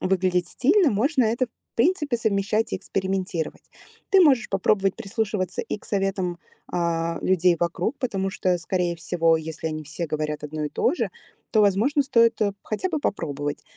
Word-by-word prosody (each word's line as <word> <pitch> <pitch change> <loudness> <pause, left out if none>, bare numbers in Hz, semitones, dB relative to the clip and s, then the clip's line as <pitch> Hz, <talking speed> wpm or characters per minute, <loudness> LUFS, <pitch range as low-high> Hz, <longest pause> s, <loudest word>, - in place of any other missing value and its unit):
выглядеть 185 -2 +1
стильно, 325 +4 +3
можно 255 +5 +2
это, 235 +3 +1
в - - -32 0.3
принципе, 295 -2 +2
совмещать 215 0 0
и - - +1
экспериментировать. 190 -3 -3 0.5
Ты 390 - +6
можешь 270 -8 +5
попробовать 195 0 +1
прислушиваться 200 -4 -2
и - - -4
к - - -20
советам, 195 -3 -1 0.3
а, 170 -1 0
людей 180 -2 +3
вокруг, 175 +8 -1
потому 195 -7 -1
что, 185 -1 0
скорее 175 -1 -1
всего, 165 0 +2
если 160 0 -5
они 155 0 -4
все 165 +4 -4
говорят 150 0 -3
одно 150 0 -4
и - - -1
то - - +1
же, - - -2 0.4
то, 215 - +3
возможно, 220 - +3
стоит, 230 -4 +3
эп 200 -1 +1
хотя 215 - -2
бы 320 -4 -1
попробовать. 145 - -3
195 Hz, 165 wpm, -24 LUFS, 170-230 Hz, 0.5 s, Ты